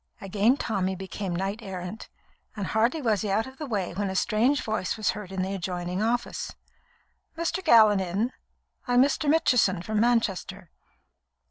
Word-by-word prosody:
Again 205 +6 +2
Tommy 190 -6 -1
became 190 -1 -5
knight 195 +4 -2
errant, 190 0 -7 0.5
and 205 -3 -3
hardly 235 - +1
was 215 -5 +2
he 210 - -2
out 210 +3 +1
of 265 0 -12
the 305 - -4
way 200 -8 -2
when 200 +2 -2
a 190 - -4
strange 235 +9 +2
voice 215 -1 -2
was 215 - +1
heard 210 -4 -8
in 190 -1 -2
the 190 +1 -3
adjoining 180 0 -3
office. 240 +2 -2 0.8
"Mr. 335 +3 -2
Gallon 215 - +6
in? 195 +7 -1 0.6
I'm 245 +1 +5
Mr. 285 +2 0
Mitchison, 245 - +3
from 215 +1 -1
Manchester." 200 -6 0
210 Hz, 160 wpm, -26 LUFS, 190-235 Hz, 0.8 s, Gallon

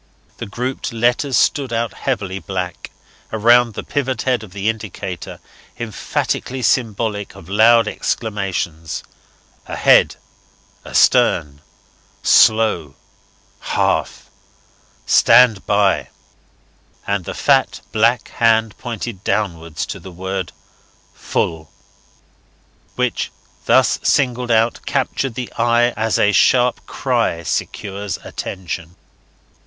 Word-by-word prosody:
The - - -5
grouped 125 +6 -4
letters 120 +3 +1
stood 135 -4 +1
out 115 -2 -1
heavily 100 -8 -3
black, 90 -2 -5 0.4
around 115 +1 +4
the - - -5
pivot 130 -4 -2
head 125 -3 +1
of 110 -4 -11
the 100 +2 -4
indicator, 105 -5 -5 0.4
emphatically 125 +2 -3
symbolic 110 -4 0
of 80 - -13
loud 115 +3 +5
exclamations: 95 -9 -3 0.6
AHEAD, - - +4 0.7
ASTERN, 70 0 +2 0.6
SLOW, 110 -10 +4 0.6
Half, - - -1 0.7
STAND 115 -4 +5
BY; 100 -1 +2 1.0
and 100 -2 -1
the - - -5
fat - - +2
black 115 +1 +2
hand 115 -2 +2
pointed 115 -4 -6
downwards 85 -7 -2
to - - -7
the 95 - -11
word 95 +1 -4 0.6
FULL, 80 -2 -3 1.3
which, - - -1 0.3
thus - - +3
singled 125 -2 +1
out, 115 0 +2
captured 135 -4 -1
the 125 -1 -5
eye 120 +1 +3
as 110 -1 -1
a 105 - +3
sharp 125 +4 +3
cry 85 0 -1
secures 100 +4 -3
attention. 90 -2 -6
110 Hz, 100 wpm, -19 LUFS, 95-120 Hz, 1.3 s, loud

